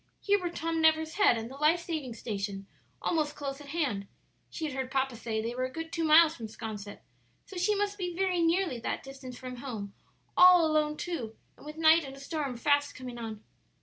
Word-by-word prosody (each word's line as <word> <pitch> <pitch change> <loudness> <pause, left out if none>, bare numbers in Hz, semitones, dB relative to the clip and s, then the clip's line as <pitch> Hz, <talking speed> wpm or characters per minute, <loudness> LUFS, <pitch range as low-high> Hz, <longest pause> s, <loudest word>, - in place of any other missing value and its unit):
Here 405 0 +2
were 355 -2 -2
Tom 330 -1 -2
Never's 315 0 +3
Head 405 - +4
and 225 0 -4
the 265 +3 -10
life 305 +4 +4
saving 310 -8 -4
station 200 -3 -4 0.4
almost 305 -3 0
close 275 0 -5
at 290 - -11
hand; 280 -11 -2 0.4
she 320 - -4
had 295 - -3
heard 260 -1 -3
papa 265 -2 0
say 220 -1 -3
they 230 +1 -3
were 255 +1 -1
a 255 - -5
good 325 +3 -6
two 330 - -1
miles 320 +1 +6
from 225 - -6
'Sconset, 210 -2 -7 0.4
so 390 - -12
she 380 +4 +2
must 410 0 -1
be 360 -1 -2
very 370 -1 +1
nearly 330 -5 +1
that - - -3
distance 265 -2 -9
from 255 -1 -7
home, 220 -6 -6 0.4
all 360 -2 +8
alone 305 -1 +1
too, 260 -12 -4 0.2
and - - -14
with 305 +1 -8
night 325 0 +6
and 270 -1 -8
a - - -12
storm 280 -3 -3
fast 285 +3 +2
coming 250 -2 -7
on. 220 -2 -6
290 Hz, 215 wpm, -30 LUFS, 245-330 Hz, 0.4 s, all